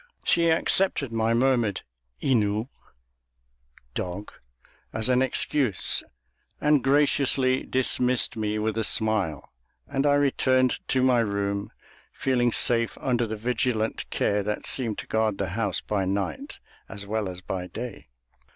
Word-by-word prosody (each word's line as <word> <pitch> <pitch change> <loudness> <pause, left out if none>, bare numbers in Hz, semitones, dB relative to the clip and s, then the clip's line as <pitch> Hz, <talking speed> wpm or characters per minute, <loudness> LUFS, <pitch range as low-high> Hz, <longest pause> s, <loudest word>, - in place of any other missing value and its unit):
She 170 -1 +2
accepted 160 -4 +2
my 115 0 +1
murmured 120 -5 +1 0.4
Inu 110 -2 +1 1.2
(dog) 90 +7 -5 0.6
as 110 +3 -1
an 125 0 +3
excuse, 130 -3 +2 0.6
and 150 -2 +2
graciously 135 -2 +3
dismissed 125 -1 +1
me 105 -1 -2
with 110 +1 -1
a - - 0
smile, 105 -10 +1 0.4
and 140 0 0
I 145 - +4
returned 130 -2 +2
to 130 -1 +1
my 125 -2 +4
room 100 -2 -2 0.4
feeling 125 -2 0
safe 115 0 +2
under 120 -2 0
the 110 - -4
vigilant 115 -1 -2
care 105 0 0
that 105 +1 -4
seemed 115 -5 0
to - - -5
guard 110 -2 0
the 100 -2 -2
house 105 +2 -1
by 100 -3 -2
night 95 -4 -3 0.3
as 100 +1 -6
well 105 -1 -2
as 90 0 -8
by 90 0 -5
day. 120 +2 -8
115 Hz, 135 wpm, -25 LUFS, 105-130 Hz, 1.2 s, I